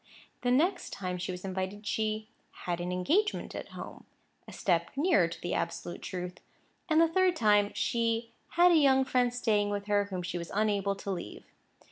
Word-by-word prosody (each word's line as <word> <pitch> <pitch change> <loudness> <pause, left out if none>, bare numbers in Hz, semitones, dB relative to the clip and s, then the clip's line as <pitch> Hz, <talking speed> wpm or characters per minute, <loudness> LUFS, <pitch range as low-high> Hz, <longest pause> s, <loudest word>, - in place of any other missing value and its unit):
The 245 - 0
next 315 +10 +2
time 180 -2 -4
she 180 - -3
was 180 +1 -7
invited, 190 +2 -4
she 215 0 -1 0.4
"had 175 -1 -1
an 180 +1 -3
engagement 325 - 0
at - - -6
home"—a - - -12
step 170 -3 0
nearer 310 - +3
to 165 - -8
the 175 - -2
absolute 170 +1 -3
truth. 180 -1 -5 0.5
And 315 0 +4
the 330 - +6
third 370 +1 +2
time, 210 -5 +3
she 230 0 0 0.2
"had 350 +1 +6
a - - +5
young 265 -3 +5
friend 250 -2 +2
staying 215 -4 +1
with 205 0 -3
her 205 -1 +2
whom 185 -3 -5
she 175 0 -3
was 170 - -6
unable 200 -2 +1
to 195 0 -5
leave." 175 - -6
205 Hz, 180 wpm, -30 LUFS, 180-255 Hz, 0.5 s, the